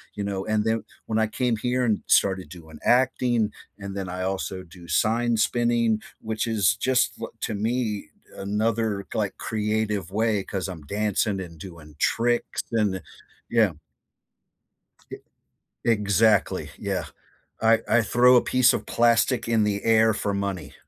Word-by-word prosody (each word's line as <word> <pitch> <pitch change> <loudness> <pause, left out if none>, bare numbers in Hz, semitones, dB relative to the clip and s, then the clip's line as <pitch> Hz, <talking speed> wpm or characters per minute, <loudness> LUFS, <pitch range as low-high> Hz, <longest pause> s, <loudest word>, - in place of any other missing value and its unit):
you 100 - -3
know? 95 -1 -3
And 110 -1 +1
then 110 0 0 0.2
when 110 0 -1
I 110 - +2
came 120 0 -1
here 125 +2 0
and 110 -3 +1
started 95 -5 +2
doing 80 -3 -12
acting, 120 -3 +2 0.3
and 100 -1 -7
then 95 -1 -3
I 90 +1 -4
also 95 -1 -3
do 85 0 -14
sign 115 +8 +1
spinning, 115 -1 +1 0.2
which 110 +1 -2
is 110 -2 +2
just 130 +1 +2
li - - -4
to 110 - -2
me 110 -4 -2 0.3
another, 105 0 -1
like, - - -1
creative 105 -4 -2
way 110 -2 +1
'cause 95 -1 -4
I'm 85 -4 -7
dancing 105 +1 0
and 85 -3 -9
doing 80 -5 -11
tricks 120 +1 0
and 105 -4 +2
the 95 - -6 0.5
yeah. 115 -5 +3 1.4
E - - -4 0.7
Exactly, 105 -1 +2
yeah - - -3 0.6
I 115 0 +5
I 120 - +4
throw 125 +2 +5
a 120 - +6
piece 125 -2 +4
of - - -3
plastic 120 +1 +2
in 115 -2 +2
the 100 -1 -1
air 110 -1 +4
for 100 -1 -2
money. 95 -7 -3
110 Hz, 150 wpm, -25 LUFS, 95-115 Hz, 1.4 s, a